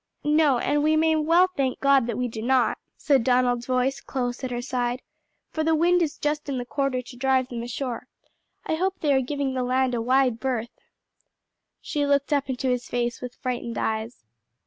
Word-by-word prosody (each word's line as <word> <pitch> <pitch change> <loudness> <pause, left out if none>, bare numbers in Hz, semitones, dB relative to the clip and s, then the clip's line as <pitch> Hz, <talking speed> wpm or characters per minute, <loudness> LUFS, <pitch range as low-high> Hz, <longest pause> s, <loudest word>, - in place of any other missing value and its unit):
"No; 295 -3 +3
and 290 +4 +1
we 310 +1 +3
may 320 0 +3
well 330 +4 +4
thank 265 -2 -1
God 275 -3 +4
that 235 -2 -3
we 250 0 0
do 220 -2 -6
not," 255 +1 +2 0.2
said 275 -5 +2
Donald's 245 -1 +2
voice 255 +1 0
close 245 -1 -3
at 260 - -2
her 240 -1 -3
side, 245 0 -2 0.5
"for 315 - -1
the 320 0 +3
wind 350 +3 +3
is 315 -4 -1
just 295 0 -2
in 270 - -2
the 245 - -3
quarter 275 -1 -1
to 245 - -12
drive 260 0 +1
them 235 -2 -5
ashore: 240 +1 -4 0.6
I - - -1
hope 370 +4 -1
they 295 -3 +2
are 265 - +3
giving 275 0 -2
the 260 - -1
land 255 0 +1
a 235 - 0
wide 255 -1 +2
berth." 240 -3 -2 1.1
She 290 -1 -1
looked 285 +1 +2
up 280 -1 0
into 260 +1 -2
his 250 -1 -1
face 240 0 -2
with 250 0 -7
frightened 240 -3 -3
eyes. 220 - -3
260 Hz, 200 wpm, -25 LUFS, 245-285 Hz, 1.1 s, well